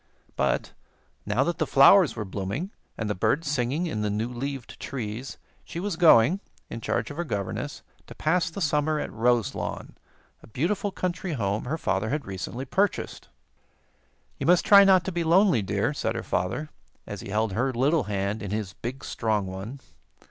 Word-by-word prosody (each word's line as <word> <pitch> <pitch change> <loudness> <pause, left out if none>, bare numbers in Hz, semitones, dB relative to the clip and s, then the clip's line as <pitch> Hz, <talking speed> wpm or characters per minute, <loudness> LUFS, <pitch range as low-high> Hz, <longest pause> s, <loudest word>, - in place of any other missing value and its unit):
But, 70 -2 0 0.5
now 105 +6 +2
that 170 +4 -2
the 160 - +1
flowers 160 +5 +6
were 105 -2 -4
blooming 100 - -4 0.3
and 110 - -2
the 105 - 0
birds 145 - 0
singing 140 +4 0
in 155 -11 -2
the 105 - 0
new 110 +3 -1
leaved 135 +1 -6
trees, 120 -1 -5 0.3
she 170 - -7
was 200 0 -2
going, 165 0 +6 0.3
in 115 - -5
charge - - -1
of 145 - -9
her 175 - -1
governess, 110 - -4 0.2
to - - -11
pass 170 +3 +1
the 180 +4 -7
summer 150 -1 +1
at - - -4
Roselawn, 115 -1 -1 0.5
a - - -15
beautiful 175 - -1
country 185 -2 -3
home 105 -5 -1
her 150 +6 -2
father 100 -7 -1
had 145 0 -2
recently 95 +7 -5
purchased. 195 +9 -1 1.1
"You - - -2
must 180 0 +5
try 200 -1 +9
not 190 -3 +5
to 190 - -2
be 170 -1 -1
lonely, 170 - +4
dear," 100 +7 0
said - - -2
her - - -3
father, 95 +12 -2 0.4
as - - -7
he - - -8
held 105 0 0
her 125 +6 +1
little 135 +4 +2
hand 100 +1 -2
in 100 - -5
his 105 -2 -3
big, 130 +6 -6
strong 110 -3 -1
one. 95 +9 -7
130 Hz, 180 wpm, -26 LUFS, 105-165 Hz, 1.1 s, try